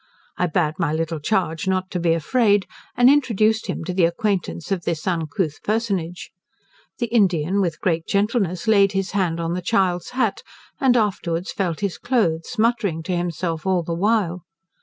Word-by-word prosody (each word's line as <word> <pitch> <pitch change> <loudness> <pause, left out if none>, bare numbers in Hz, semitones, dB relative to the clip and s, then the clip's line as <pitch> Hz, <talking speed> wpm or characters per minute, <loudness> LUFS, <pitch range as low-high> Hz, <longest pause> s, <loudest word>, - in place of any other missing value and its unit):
I 180 - 0
bade 155 -1 0
my 165 -4 +1
little 160 0 -2
charge 180 +1 -1
not 185 0 0
to 180 - -2
be 170 -1 +2
afraid, 205 - +2 0.3
and 245 0 +6
introduced 225 -6 +3
him - - -3
to 180 +2 -4
the 180 -2 +3
acquaintance 180 -1 -2
of 190 -3 0
this 165 -2 -3
uncouth 160 -3 -2
personage. 195 -6 -2 0.7
The 240 - 0
Indian, 195 -5 +2
with 170 -4 -1
great 165 -3 -1
gentleness, 200 -3 0
laid 200 -3 +4
his 195 0 -1
hand 180 -5 0
on 165 0 -2
the 180 - -2
child's 180 -2 0
hat, 260 - +1 0.4
and 255 -2 +4
afterwards 185 -5 -1
felt 180 -4 -2
his 200 -3 -2
cloaths, 210 -5 0
muttering 215 -8 +1
to 180 +2 -2
himself 170 -1 -3
all 185 -2 +2
the 170 - -3
while. 185 -1 +1
185 Hz, 170 wpm, -22 LUFS, 165-210 Hz, 0.7 s, and